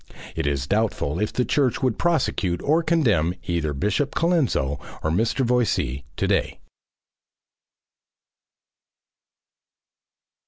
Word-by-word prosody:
It 80 -3 -1
is 70 -2 -1
doubtful 100 -5 0
if 105 - 0
the 125 - 0
church 135 -4 +1
would 125 -4 0
prosecute 130 - 0
or 155 +4 +3
condemn 115 - +2
either 85 -3 -1
Bishop 105 - -1
Colenso 135 - +1 0.2
or 80 - 0
Mr. 115 - +1
Voysey 115 - 0
to - - 0
day. - - 0
105 Hz, 105 wpm, -23 LUFS, -, 0.2 s, or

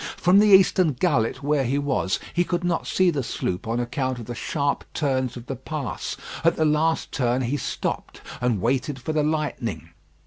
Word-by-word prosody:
From 185 +3 +5
the 210 - +5
eastern 190 -4 +5
gullet 125 -4 0
where 145 -1 +2
he 130 +3 0
was, 135 -9 0
he 175 - +3
could 175 0 -2
not 175 -1 -1
see 185 -1 +3
the 145 -4 -1
sloop 95 -5 -3
on 115 +2 0
account 130 +1 -2
of 115 - -7
the 120 - -5
sharp 140 +4 -1
turns 130 -4 0
of 120 - -9
the 135 - -4
pass. 140 +2 -5 0.3
At 165 - +4
the 160 - +1
last 155 +2 +1
turn 125 0 0
he 125 +4 -1
stopped - - -4 0.2
and 120 -6 0
waited 130 +3 0
for 155 +5 -3
the 155 - +2
lightning. 150 -7 -2
140 Hz, 195 wpm, -24 LUFS, 125-160 Hz, 0.3 s, From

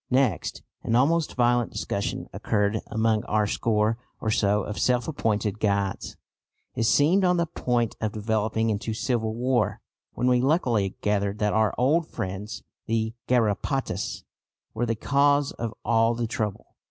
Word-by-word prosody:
Next, 125 -7 0 0.2
an 115 - 0
almost 155 +6 +2
violent 120 -1 +2
discussion 100 - -3
occurred 105 0 0
among 110 -1 +1
our 105 0 +1
score 110 +1 +1 0.2
or 110 - -1
so 105 -1 +2
of 105 - -5
self 125 -1 +2
appointed 110 -8 -1
guides. 100 -2 -1 0.6
It 115 - 0
seemed 160 - +4
on 180 -1 +3
the 170 - +2
point 120 -8 -1
of 110 -1 0
developing 110 +1 0
into 110 +1 -3
civil 110 -2 -1
war, 120 -3 0 0.3
when 125 - -2
we 125 -1 +4
luckily 125 - +1
gathered 100 -1 0
that 105 -2 0
our 110 -1 +2
old 155 +6 +2
friends 100 +3 -5 0.2
the 110 0 0
garrapatas 125 +3 0 0.5
were 120 +2 -1
the 115 - 0
cause 140 +4 +2
of 115 -2 -4
all 115 +1 +3
the 120 0 -1
trouble. 110 -2 -3
115 Hz, 150 wpm, -26 LUFS, 105-125 Hz, 0.6 s, seemed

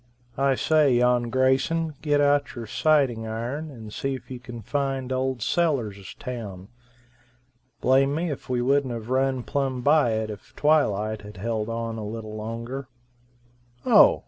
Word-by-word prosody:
I 135 -1 +3
say, 150 -2 +3
yon 120 0 +3
Grayson, 135 +6 +2
get 145 -2 +2
out 145 0 +2
your 120 -2 -5
sighting 125 -2 +2
iron 120 +8 -4
and 110 -6 -10
see 135 0 -2
if 130 - -11
you 125 - -5
can 120 -2 -9
find 135 +1 -1
old 130 -2 -1
Sellers' 115 - -1
town. 105 -6 -7 1.1
Blame 135 +2 +3
me 165 +1 -1
if 140 - -7
we 125 -1 0
wouldn't 135 -1 +2
have 115 +1 -7
run 130 -1 +1
plumb 135 -2 -1
by 145 -3 +4
it 110 0 -2
if 105 - -12
twilight 110 -9 +2
had 105 0 -11
held 110 +2 -2
on 115 -1 -3
a - - -5
little 110 0 -6
longer. 115 +5 -5 1.0
Oh! - - +7
125 Hz, 155 wpm, -25 LUFS, 115-140 Hz, 1.1 s, Oh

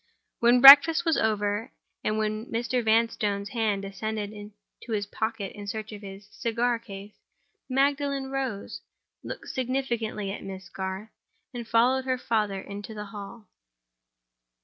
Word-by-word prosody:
When 240 +1 +4
breakfast 285 +5 +10
was 325 -2 +3
over, 210 +2 0 0.3
and 215 - 0
when 215 +1 -2
Mr. 240 +2 -1
Vanstone's 220 -3 +1
hand 215 -4 -1
descended 210 +1 -5 0.3
to 235 - -9
his 205 -1 -1
pocket 220 -1 -4
in 205 -1 -9
search 215 +1 -5
of 210 -1 -9
his 195 0 -10
cigar 235 +1 -1
case, 205 -2 -10 0.6
Magdalen 275 0 0
rose; 260 -7 -4 0.4
looked - - -8
significantly 235 -6 -2
at 200 - -7
Miss 190 0 -8
Garth; 190 +2 -5 0.4
and 240 -2 -6
followed 255 +3 +3
her 260 -1 0
father 215 -5 -1
into 205 +3 -8
the 210 0 -6
hall. 205 +2 -10
220 Hz, 135 wpm, -27 LUFS, 205-245 Hz, 0.6 s, breakfast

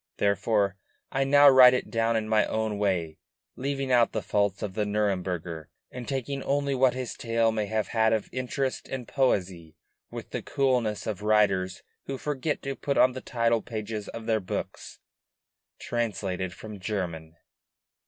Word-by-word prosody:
Therefore, 100 0 +1 0.3
I 135 - +1
now 145 +1 +7
write 130 -2 +9
it - - -3
down 115 0 +1
in 110 -1 -1
my 110 -1 +3
own 110 -2 -2
way; 90 -6 -1 0.4
leaving 135 0 -2
out 120 -2 +4
the - - -2
faults 100 -1 0
of 100 -3 -3
the 105 - 0
Nuremburger, 90 -6 -2 0.3
and 125 -1 -7
taking 135 0 -3
only 140 0 0
what 130 -1 +3
his 130 -2 -4
tale 115 -1 +1
may 110 -2 -2
have 110 0 -1
had 110 -1 +2
of 110 -1 0
interest 130 +1 -3
and 125 -3 -5
poesy 90 - 0 0.3
with - - -8
the - - -3
coolness 125 -6 0
of 105 -2 -4
writers 100 -3 +2 0.2
who 135 - -3
forget 150 +1 -2
to 135 0 -3
put 140 +1 -2
on 130 - +6
the 130 0 -7
title 115 -2 +1
pages 110 -2 -5
of 115 -1 -7
their 110 -1 +2
books: 95 - -6 0.8
"Translated 95 -6 -2
from 105 +4 -10
the 100 - -9
German." 85 -6 -4
110 Hz, 165 wpm, -27 LUFS, 100-130 Hz, 0.8 s, write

